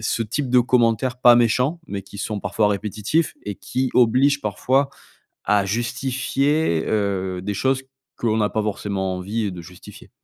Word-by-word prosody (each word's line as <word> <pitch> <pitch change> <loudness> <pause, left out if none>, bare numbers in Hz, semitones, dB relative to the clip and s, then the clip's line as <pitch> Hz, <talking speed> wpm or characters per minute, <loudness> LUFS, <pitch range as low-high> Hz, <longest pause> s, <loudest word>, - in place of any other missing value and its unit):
ce 110 +1 -1
type 125 +4 -3
de 125 - +5
commentaires 120 0 +1
pas 120 -1 +7
méchants, 125 +7 +2
mais 100 -1 -5
qui 100 +1 -12
sont 105 0 -3
parfois 105 +1 +1
répétitifs 105 - -1
et 105 - -4
qui 130 0 -2
obligent 130 +4 +4
parfois 130 +6 0 0.5
à 100 -1 +2
justifier, 130 - 0
heu, 95 -3 -1
des 105 +2 -3
choses 135 +5 0 0.3
qu'on 110 -2 0
n'a 105 -1 +2
pas 110 - -1
forcément 100 -2 -2
envie 100 +3 -2
de 90 - -8
justifier. 90 +1 -14
110 Hz, 160 wpm, -22 LUFS, 100-130 Hz, 0.5 s, pas